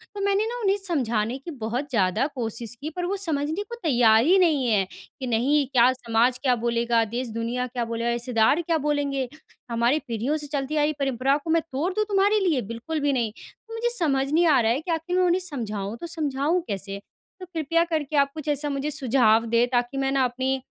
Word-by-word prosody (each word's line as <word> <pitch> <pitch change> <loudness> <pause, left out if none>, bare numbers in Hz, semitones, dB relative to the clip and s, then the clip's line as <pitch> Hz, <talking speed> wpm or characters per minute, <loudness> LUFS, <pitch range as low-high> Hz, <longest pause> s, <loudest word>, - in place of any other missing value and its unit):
तो 405 - -5
मैंने 400 +2 +2
ना 485 +1 -4
उन्हें 395 -1 +2
समझाने 250 - -1
की 305 +5 -8
बहुत 250 +2 -4
ज़्यादा 215 +1 +1
कोशिश 230 -1 -3
की, 305 - -3
पर 355 +2 -4
वो 390 - -1
समझने 320 +1 -1
को 470 +3 -8
तैयार 235 -6 +5
ही 370 +4 +5
नहीं 310 -7 +3
है 205 -3 +3
कि, 260 -2 -10
"नहीं, 270 +6 +2
क्या 255 -1 +4
समाज 240 0 +1
क्या 255 -3 +3
बोलेगा? 235 -1 +2
देश-दुनिया 235 +1 -3
क्या 240 -1 -3
बोलेगा? 230 +1 -2
रिश्तेदार 240 +5 +2
क्या 330 -1 0
बोलेंगे? 280 -3 0 0.4
हमारी 235 +6 +2
पीढ़ियों 240 +6 -1
से 295 -1 -4
चलती 285 +1 -2
आ 295 - +3
रही 305 - +1
परंपरा 270 +1 +1
को 300 +2 -9
मैं 330 0 +3
तोड़ 300 +8 -1
दूँ 425 +2 0
तुम्हारे 405 +1 +3
लिए? 330 -10 +1
बिल्कुल 305 +8 -4
भी 285 -1 +1
नहीं।" 235 -4 0
तो 450 - -15
मुझे 465 +1 0
समझ 275 -4 0
नहीं 335 +3 +4
आ 280 -4 +5
रहा 225 - +2
है 260 +5 0
कि 345 +1 -4
आखिर 330 +2 -2
मैं 370 - +4
उन्हें 355 +1 +3
समझाऊँ, 220 - -4
तो 340 - -4
समझाऊँ 310 +1 0
कैसे? 195 0 -4 0.4
तो 370 - -7
कृपया 335 -1 0
करके 310 -3 -2
आप 280 0 +3
कुछ 310 -1 -8
ऐसा 295 0 -1
मुझे 280 +2 -2
सुझाव 240 -5 +3
दें, 235 +1 +2
ताकि 245 +2 0
मैं 270 0 0
ना 270 -1 +2
अपने 260 +2 -1
275 Hz, 215 wpm, -25 LUFS, 235-320 Hz, 0.4 s, तैयार